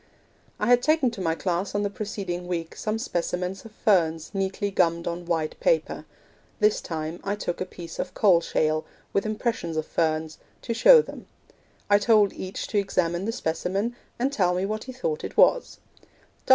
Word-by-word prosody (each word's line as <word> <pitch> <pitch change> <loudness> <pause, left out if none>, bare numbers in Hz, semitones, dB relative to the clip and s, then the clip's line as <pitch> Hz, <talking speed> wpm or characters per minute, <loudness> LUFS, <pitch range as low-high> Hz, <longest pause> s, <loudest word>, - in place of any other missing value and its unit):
I - - 0
had 245 +2 +5
taken 305 -3 +3
to 220 -4 -7
my 165 -2 0
class 180 +3 -2
on 205 - +1
the 205 - 0
preceding 195 -4 -4
week 165 -2 -3
some 215 +1 -2
specimens 180 0 -3
of 225 - -10
ferns 165 -7 +1
neatly 195 +1 -1
gummed 170 -3 +1
on 170 +1 -4
white 160 -3 -1
paper.... - - +1 0.5
This 210 -1 +3
time 160 +1 -4
I 200 +1 -1
took 180 -4 -4
a 185 - -2
piece 170 -2 -9
of 185 0 -4
coal 185 -5 +5
shale, 155 -1 0 0.3
with 200 +2 +1
impressions 215 -7 -2
of 155 - -1
ferns, 155 -1 -1 0.2
to 235 - -2
show 470 - +7
them.... - - -10 0.6
I 205 0 +5
told 210 -2 +4
each 185 0 -5
to 210 - +2
examine 180 -2 0
the 225 - 0
specimen, 195 +5 -2 0.2
and 265 +3 0
tell 180 -7 +2
me 185 +2 0
what 215 +2 -3
he 260 - -6
thought 455 - -3
it - - -6
was. - - +4
190 Hz, 180 wpm, -25 LUFS, 170-215 Hz, 0.6 s, show